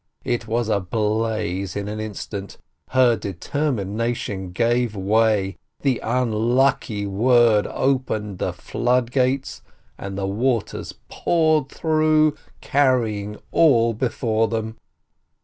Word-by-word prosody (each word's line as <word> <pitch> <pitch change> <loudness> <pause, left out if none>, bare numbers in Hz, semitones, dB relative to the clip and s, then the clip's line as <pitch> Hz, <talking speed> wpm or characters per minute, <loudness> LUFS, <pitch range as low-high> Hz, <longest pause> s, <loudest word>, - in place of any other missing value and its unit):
It 120 - -1
was 115 0 0
ablaze 105 -2 -1
in 100 0 -3
an 105 +1 -4
instant. 100 -2 -6 0.3
Her 125 -2 +4
deter 110 - -2
mination 105 -3 -3
gave 120 +3 +1
way, 100 -1 +1 0.2
the 135 -4 +1
unlucky 115 -2 +1
word 115 +1 +3
opened 110 -7 -1
the - - -1
flood 125 -1 -1
gates, 130 +1 0 0.4
and 100 0 -6
the 100 - -2
waters 115 +3 -1
poured 155 -5 +1
through, 155 -1 +2 0.3
carrying 115 -7 +1
all 115 -8 +4
be 120 +3 -1
fore 115 -2 0
them. 110 0 -3
115 Hz, 110 wpm, -22 LUFS, 105-130 Hz, 0.4 s, Her